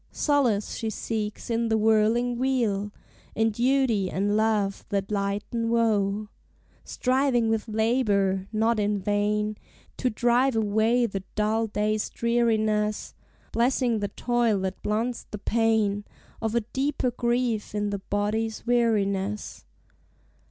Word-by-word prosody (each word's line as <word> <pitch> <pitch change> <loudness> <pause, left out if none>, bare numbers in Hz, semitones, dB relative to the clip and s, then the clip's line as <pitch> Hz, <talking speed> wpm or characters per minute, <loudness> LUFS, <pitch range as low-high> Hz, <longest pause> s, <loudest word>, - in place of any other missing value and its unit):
Solace 255 -9 +1
she 225 - -3
seeks 215 +1 -4
in 230 0 0
the 220 - +2
whirling 225 +3 +2
wheel, 225 -6 0 0.4
In 225 0 +2
duty 235 -4 +1
and 205 +3 0
love 215 -2 +1
that 200 -1 -2
lighten 205 +3 -1
woe; 215 -3 +1 0.6
Striving 255 -3 +1
with 225 +1 -1
labor, 210 -4 +1
not 225 +1 +1
in 205 0 +1
vain, 210 +2 0 0.4
To 255 - 0
drive 240 +3 +2
away 220 +3 +2
the 195 -4 -4
dull 220 +2 +1
day's 210 0 -1
dreariness, 220 -3 0 0.4
Blessing 240 -1 +1
the 205 - -1
toil 235 +1 0
that 190 0 -4
blunts 230 +3 -2
the 210 - -5
pain 215 -2 +1 0.4
Of 225 0 -1
a 235 - +3
deeper 265 +3 -1
grief 235 -3 -1
in 205 0 -1
the 200 - -2
body's 210 +3 -2
weariness. 210 -4 0
220 Hz, 125 wpm, -26 LUFS, 205-235 Hz, 0.6 s, a